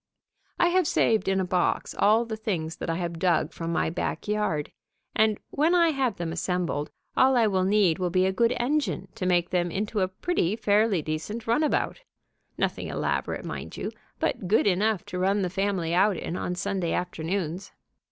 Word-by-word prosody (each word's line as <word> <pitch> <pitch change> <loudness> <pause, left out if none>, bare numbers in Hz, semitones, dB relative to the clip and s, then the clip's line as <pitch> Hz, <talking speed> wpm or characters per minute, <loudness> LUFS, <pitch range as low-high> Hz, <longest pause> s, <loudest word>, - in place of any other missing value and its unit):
I 345 - +4
have 365 -2 +2
saved 220 -1 +2
in 190 0 +2
a 190 - 0
box 180 0 0
all 220 +3 +3
the 225 -1 -4
things 175 -7 -3
that - - -5
I 165 - 0
have 170 -1 -3
dug 170 -3 +1
from 165 0 -4
my 170 - 0
back 175 - -3
yard, 210 -8 -1 0.4
and, 215 -1 +3
when 315 +5 +2
I 340 -1 +5
have 265 -8 0
them 170 -2 -4
assembled, 170 -3 -2 0.3
all 260 0 +5
I 230 - +5
will 190 -3 +1
need 195 -4 +3
will 180 -1 0
be 185 +1 +2
a 190 - +2
good 230 +4 +2
engine 240 - -1
to 185 - -3
make 175 -1 +2
them 175 -1 +1
into 210 +4 -2
a 185 - +2
pretty 190 - -1
fairly 210 -5 +2
decent 160 +10 -4
runabout, 295 - +1 0.6
nothing - - -1
elaborate, - - -2
mind - - -6
you, - - -3 0.3
but 185 - -1
good 210 - +3
enough 205 0 +1
to 180 - -5
run 195 +2 +2
the 180 - -2
family 190 -4 -1
out 190 +1 +3
in 170 - -4
on 180 -1 -2
Sunday 180 -2 -1
afternoons. 180 +1 -3
190 Hz, 190 wpm, -26 LUFS, 175-220 Hz, 0.6 s, I